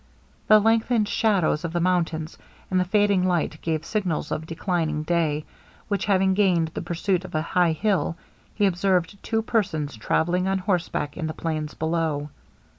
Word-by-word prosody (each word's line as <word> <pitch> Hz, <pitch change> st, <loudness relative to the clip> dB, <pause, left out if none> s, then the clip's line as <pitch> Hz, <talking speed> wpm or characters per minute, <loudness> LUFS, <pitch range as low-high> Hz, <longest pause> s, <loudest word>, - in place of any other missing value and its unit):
The 215 Hz, -, +8 dB
lengthened 225 Hz, 0 st, +2 dB
shadows 195 Hz, -8 st, +1 dB
of 165 Hz, -1 st, -4 dB
the 175 Hz, -, 0 dB
mountains, 170 Hz, -3 st, 0 dB, 0.4 s
and 185 Hz, -, +3 dB
the -, -, +3 dB
fading 205 Hz, -1 st, +2 dB
light 170 Hz, -3 st, -1 dB
gave 160 Hz, -1 st, -2 dB
signals 180 Hz, -8 st, -2 dB
of 155 Hz, -, -3 dB
declining 165 Hz, -3 st, -1 dB
day; 155 Hz, -2 st, 0 dB, 0.4 s
when 200 Hz, -1 st, 0 dB
having 190 Hz, -1 st, +2 dB
gained 180 Hz, -5 st, +2 dB
the 170 Hz, +1 st, -5 dB
summit 185 Hz, +1 st, 0 dB
of 185 Hz, -, -8 dB
a 155 Hz, -, +1 dB
high 175 Hz, 0 st, +2 dB
hill, 180 Hz, -1 st, 0 dB, 0.4 s
he 205 Hz, -, +2 dB
observed 185 Hz, 0 st, +1 dB
two 225 Hz, 0 st, -1 dB
persons 160 Hz, -, -1 dB
travelling 175 Hz, +11 st, 0 dB
on 195 Hz, 0 st, +1 dB
horseback 175 Hz, -6 st, -2 dB
in 165 Hz, -3 st, -2 dB
the 155 Hz, -, -5 dB
plains 155 Hz, -2 st, -3 dB
below. 160 Hz, -2 st, -1 dB
175 Hz, 165 wpm, -24 LUFS, 160-195 Hz, 0.4 s, The